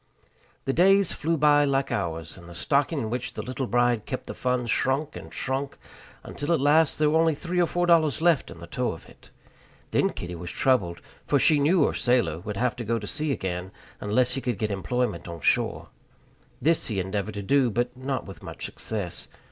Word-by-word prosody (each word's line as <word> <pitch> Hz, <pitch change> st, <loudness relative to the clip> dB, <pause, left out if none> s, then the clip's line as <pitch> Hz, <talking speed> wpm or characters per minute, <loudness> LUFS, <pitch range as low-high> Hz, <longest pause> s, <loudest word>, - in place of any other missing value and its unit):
The 135 Hz, -, 0 dB
days 195 Hz, +3 st, +4 dB
flew 165 Hz, +2 st, -1 dB
by 145 Hz, 0 st, +5 dB
like 135 Hz, -1 st, +1 dB
hours, 80 Hz, -4 st, -3 dB
and 85 Hz, -1 st, -13 dB
the 85 Hz, -, -10 dB
stocking 145 Hz, -, +1 dB
in 110 Hz, -5 st, -2 dB
which 125 Hz, 0 st, -3 dB
the -, -, -5 dB
little 130 Hz, 0 st, -3 dB
bride 120 Hz, -2 st, +1 dB
kept 130 Hz, -, -4 dB
the -, -, -6 dB
funds 125 Hz, -2 st, -1 dB
shrunk 140 Hz, +3 st, 0 dB
and 80 Hz, -, -9 dB
shrunk, 135 Hz, +9 st, -3 dB, 0.5 s
until 145 Hz, +4 st, -4 dB
at 165 Hz, -, +2 dB
last 150 Hz, +3 st, +4 dB
there 150 Hz, -1 st, +3 dB
were 160 Hz, -, +4 dB
only 165 Hz, -2 st, +3 dB
three 180 Hz, +3 st, -1 dB
or 175 Hz, -, +3 dB
four 175 Hz, +1 st, 0 dB
dollars 160 Hz, -5 st, +4 dB
left 165 Hz, -3 st, +3 dB
in -, -, -10 dB
the 85 Hz, -, -9 dB
toe 125 Hz, +7 st, -2 dB
of 80 Hz, -, -12 dB
it. -, -, -18 dB, 0.6 s
Then -, -, +3 dB
Kitty 90 Hz, 0 st, -6 dB
was 85 Hz, 0 st, -6 dB
troubled; 95 Hz, -10 st, +1 dB, 0.3 s
for 145 Hz, -, +3 dB
she 150 Hz, +2 st, +4 dB
knew 155 Hz, +3 st, +4 dB
her -, -, 0 dB
sailor 120 Hz, -11 st, +1 dB
would 105 Hz, +2 st, -6 dB
have 125 Hz, +1 st, +1 dB
to 120 Hz, -, -4 dB
go 115 Hz, +1 st, 0 dB
to 105 Hz, -, -6 dB
sea 150 Hz, +7 st, -1 dB
again 95 Hz, -6 st, -3 dB, 0.3 s
unless 120 Hz, +5 st, +1 dB
he 135 Hz, -, -3 dB
could 125 Hz, -5 st, -2 dB
get 105 Hz, +1 st, -1 dB
employment 100 Hz, -1 st, -2 dB
on 85 Hz, -1 st, -7 dB
shore. -, -, +1 dB, 0.7 s
This 160 Hz, +5 st, +2 dB
he 105 Hz, -4 st, -2 dB
endeavored 100 Hz, +3 st, -3 dB
to 100 Hz, -, -4 dB
do, 135 Hz, +3 st, +3 dB
but 120 Hz, +3 st, -1 dB
not 130 Hz, 0 st, -3 dB
with 95 Hz, -, -10 dB
much -, -, -6 dB
success. 105 Hz, -6 st, -5 dB
125 Hz, 210 wpm, -26 LUFS, 100-145 Hz, 0.7 s, by